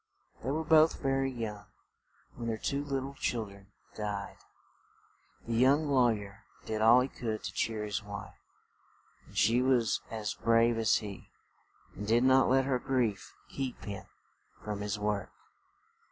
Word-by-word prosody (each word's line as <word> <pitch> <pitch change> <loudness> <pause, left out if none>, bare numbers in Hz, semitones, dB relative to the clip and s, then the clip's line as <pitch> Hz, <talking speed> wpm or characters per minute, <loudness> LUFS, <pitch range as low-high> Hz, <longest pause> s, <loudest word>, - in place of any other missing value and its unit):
They 130 - -2
were 155 +3 -1
both 160 0 +5
very 135 -1 +1
young 110 -5 -6 0.7
when 120 -1 -6
their 115 -1 -1
two 140 +5 -2
lit 135 -2 -2
tle 135 +1 -6
chil 120 -4 -2
dren 100 -1 -14 0.3
died. 105 -2 -4 1.1
The 115 - -3
young 140 +6 +4
law 125 -3 +5
yer 105 -1 -4 0.2
did 110 -1 -2
all 115 +3 +7
he 130 - 0
could 110 -5 -4
to - - -5
cheer 110 -2 -1
his 105 -1 -2
wife; 100 -1 -8 0.9
and - - -13
she 120 +2 +4
was 125 -3 +2
as 110 -2 -3
brave 115 0 +3
as 110 - +3
he, 100 -3 -5 0.6
and 105 - -7
did 115 +3 +4
not 130 0 +5
let 135 +1 +4
her 130 -2 +1
grief 120 -8 -1
keep 135 -2 -5
him 100 -1 -6 0.6
from 105 -1 -4
his 105 0 -2
work. 105 -1 -1
115 Hz, 160 wpm, -31 LUFS, 105-130 Hz, 1.1 s, all